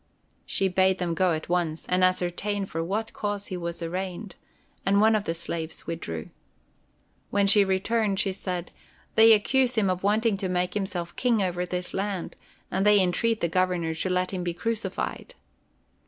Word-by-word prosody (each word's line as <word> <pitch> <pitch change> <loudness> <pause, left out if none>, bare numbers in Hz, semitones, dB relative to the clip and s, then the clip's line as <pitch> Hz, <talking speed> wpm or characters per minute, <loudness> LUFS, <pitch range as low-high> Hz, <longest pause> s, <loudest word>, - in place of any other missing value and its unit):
She 195 - +1
bade 190 0 +3
them 175 -2 -1
go 185 +1 +2
at 155 0 -4
once 170 -3 -1
and 180 0 +2
ascertain 185 +3 0
for 165 -3 -3
what 210 +6 -3
cause 205 -1 -3
he - - -1
was 170 -1 -5
arraigned, 185 +3 -4 0.5
and 200 +1 +3
one 220 +1 +5
of 210 -1 -1
the 165 - -1
slaves 165 -1 -4
withdrew. 85 - -5 1.0
When 200 0 +2
she 200 +1 +6
returned 195 +1 0
she 195 - +1
said: 180 -2 -4 0.4
"They 225 +1 +7
accuse 255 +4 +2
him 200 -4 +2
of 185 0 -3
wanting 215 +1 +2
to 190 -1 -3
make 180 0 0
himself 185 -4 -3
King 235 -5 +2
over 180 -1 -2
this 180 0 -4
land, 195 -2 -3 0.4
and 190 +1 +1
they 210 0 +6
entreat 215 +5 +1
the 170 - +2
Governor 175 -1 0
to 160 +4 -3
let 180 0 0
him 180 -1 -2
be 175 -1 -2
crucified." 230 +3 -3
185 Hz, 175 wpm, -26 LUFS, 175-205 Hz, 1.0 s, They